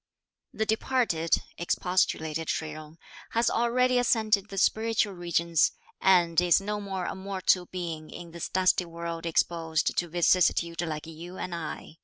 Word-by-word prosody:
"The 220 - -2
departed," 220 -7 +1 0.2
expostulated 165 -3 0
Shih 155 -1 -2
Jung, 155 +1 -10 0.4
"has 230 +1 +2
already 250 +2 +2
ascended 215 -4 +2
the 195 - -8
spiritual 220 0 +2
regions, 170 -2 +1 0.3
and 175 -3 +4
is 175 0 +4
no 210 +1 -3
more 190 -3 -4
a - - -3
mortal 190 -2 0
being 165 -4 -5
in 170 -1 -9
this 170 0 -5
dusty 185 -1 +2
world 170 0 -5
exposed 165 -1 0
to 175 - 0
vicissitude 170 0 +2
like 155 -3 -4
you 165 +3 -9
and 180 - -5
I. 160 -1 -6
175 Hz, 145 wpm, -28 LUFS, 165-200 Hz, 0.4 s, and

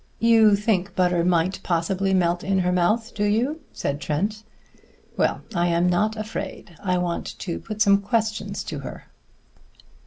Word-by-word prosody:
"You 225 -2 +5
think 200 -2 0
butter 180 -2 +2
might 175 +1 +1
possibly 185 +3 0
melt 175 -2 +1
in 195 0 +1
her 180 -1 +1
mouth, 215 +7 +1
do 205 - -2
you?" 240 +10 +1
said 140 +1 -3
Trent. 205 +8 -1 0.7
"Well, - - 0
I 175 -2 +1
am 170 +1 +2
not 210 +5 +1
afraid. 215 -4 -6
I 185 -2 +1
want 175 -1 -3
to 175 -4 -4
put 215 -1 -1
some 200 -1 +4
questions 220 +1 -1
to - - -5
her." - - -8
195 Hz, 155 wpm, -24 LUFS, 175-215 Hz, 0.7 s, You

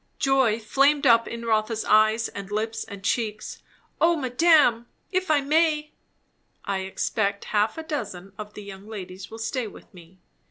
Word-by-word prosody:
Joy 265 -5 +2
flamed 275 +6 +2
up 230 -2 +5
in 235 0 -6
Rotha's 220 0 0
eyes 215 +1 +4
and 195 -1 -8
lips 220 +1 -2
and 200 -2 -10
cheeks. 215 0 -2 0.4
"O 335 +1 +5
madame! 260 -3 +3 0.2
if 370 -1 -1
I 300 -2 +4
may." 300 +1 +1 0.7
"I 200 -1 -1
expect 200 +1 -2
half 210 +4 +1
a 320 - -5
dozen 205 - -5
of 210 0 -9
the 210 - -8
young 200 0 -10
ladies 190 -3 -8
will 225 - -9
stay 225 +1 -3
with 205 - -14
me. 175 0 -16
225 Hz, 160 wpm, -25 LUFS, 205-275 Hz, 0.7 s, up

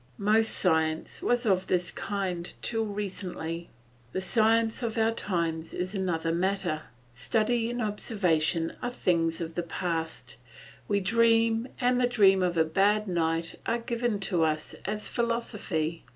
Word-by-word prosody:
Most 215 +2 +3
science 160 -3 +1
was 245 0 +1
of 190 -3 +2
this 180 -1 0
kind 185 -4 -3
till 225 -1 0
recently. 185 -5 -5 0.4
The - - 0
science 225 +4 +2
of 230 -2 -2
our 225 0 +3
times 170 -6 -2
is 185 +2 -3
another 170 -4 -1
matter; 175 -3 -1 0.3
study 225 - +1
and 240 0 -2
observation 175 -6 0
are 245 - -1
things 170 -8 0
of 165 0 -4
the 175 - -1
past; 165 -6 -4 0.5
we 200 -1 +1
dream 230 +3 +3
and 250 0 +2
the 245 - +4
dreams 195 -6 +5
of 175 -1 -1
a 160 - +4
bad 205 +6 +2
night 165 -2 -1
are 230 - +2
given 235 -2 -1
to 180 -4 +1
us 155 -1 -1
as 210 +1 -2
philosophy. 210 -9 -2
195 Hz, 145 wpm, -28 LUFS, 165-225 Hz, 0.5 s, dreams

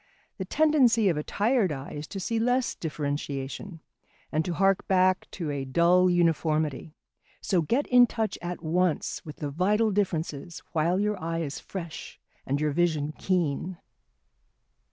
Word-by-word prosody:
The 190 - -3
tendency 250 -5 +4
of 165 - 0
a - - 0
tired 215 - +1
eye 135 -1 -6
is 150 +1 -6
to 195 - -6
see 225 +4 -1
less 245 +2 +1
differentiation, 145 +2 -4 0.5
and 155 - +1
to 175 - -2
hark 195 +1 +2
back 185 -1 +2
to 165 -5 -3
a 140 -1 -3
dull 170 +7 +4
uniformity; 160 -3 0 0.4
so 180 -3 +1
get 240 - 0
in 245 -1 +6
touch 220 -3 -2
at 175 0 -5
once 170 0 0
with 150 -2 -9
the 145 -1 -5
vital 210 +8 +2
differences 175 -4 -2
while 170 +4 +1
your 210 -2 -1
eye 165 0 -2
is 145 -3 -4
fresh 170 -5 -8 0.3
and 140 +2 0
your 150 0 +1
vision 155 -2 0
keen. 175 -1 -1
175 Hz, 155 wpm, -27 LUFS, 155-195 Hz, 0.5 s, in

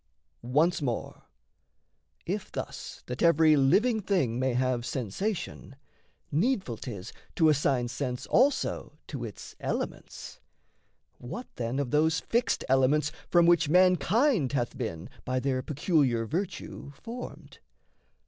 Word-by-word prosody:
Once 150 +8 +2
more, 125 -5 -4 1.0
if - - -3
thus, - - -6
that 125 0 -5
every 160 -2 +5
living 215 - +3
thing 155 - 0
May 130 -1 +1
have 125 -1 +1
sensation, 135 - -4 0.6
needful 185 - 0
'tis 105 -5 -7 0.2
to 160 -2 +5
assign 135 -4 +2
Sense 125 0 -4
also 250 - +1
to 135 -5 -6
its 110 -4 -8
elements, - - -5 0.8
what 235 - -6
then 120 +2 -2
Of 140 -3 -2
those 160 +2 +3
fixed 235 +2 0
elements 135 +3 +3 0.2
from 175 -1 +5
which 170 -3 +4
mankind 180 - +3
Hath 120 -4 -1
been, 85 -9 -4 0.2
by 130 0 -1
their 130 -1 0
peculiar 135 -5 +1
virtue, 170 - -4
formed? 240 - -9
145 Hz, 120 wpm, -28 LUFS, 125-175 Hz, 1.0 s, every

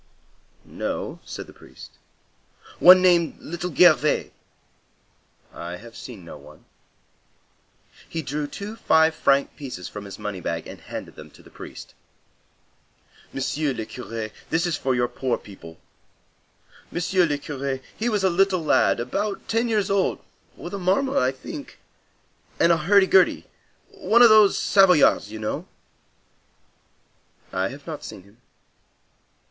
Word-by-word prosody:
"No," - - -5
said - - -8
the - - -15
priest. - - -14 0.9
"One 185 +1 +8
named 175 -3 +3
Little 175 +2 -5
Gervais?" 155 -4 +4 1.2
"I 85 +1 -7
have 115 +5 -13
seen 105 -9 -10
no 75 - -10
one." 75 +2 -17 1.4
He 165 -1 -4
drew 145 +2 -3
two 200 +8 -7
five 160 -4 +3
franc 140 -2 +1
pieces 125 - -7
from 105 +1 -9
his 100 - -9
money 105 -2 -5
bag 85 0 -3
and - - -11
handed - - -8
them - - -12
to - - -19
the - - -18
priest. - - -11 1.4
"Monsieur 140 +2 -2
le 110 - -5
Curé, 110 +1 -7 0.2
this 165 +2 +1
is 170 -3 0
for 130 -2 -1
your 120 0 +1
poor 130 0 -2
people. 85 -5 -13 1.1
Monsieur 180 +1 +1
le 145 -2 -1
Curé, 140 -2 -4 0.2
he 230 +2 -1
was 210 -4 0
a 190 - +4
little 185 -1 +2
lad, - - +3
about 195 - -3
ten 230 +2 0
years 215 -4 0
old, 200 -1 +1 0.4
with - - -8
a 200 - -3
marmot, 195 +10 +1
I 130 +1 +2
think, 130 - -9 0.8
and 170 - +5
a 170 - +4
hurdy 195 +5 +4
gurdy. 190 -1 +3 0.5
One 235 +2 +3
of 235 - +9
those 215 -2 +6
Savoyards, 180 - +4
you 110 - -6
know?" 110 0 -4 1.9
"I 95 0 0
have 140 +6 -10
not 160 -3 -7
seen 95 - -9
him." 100 +5 -23
155 Hz, 140 wpm, -23 LUFS, 115-185 Hz, 1.9 s, of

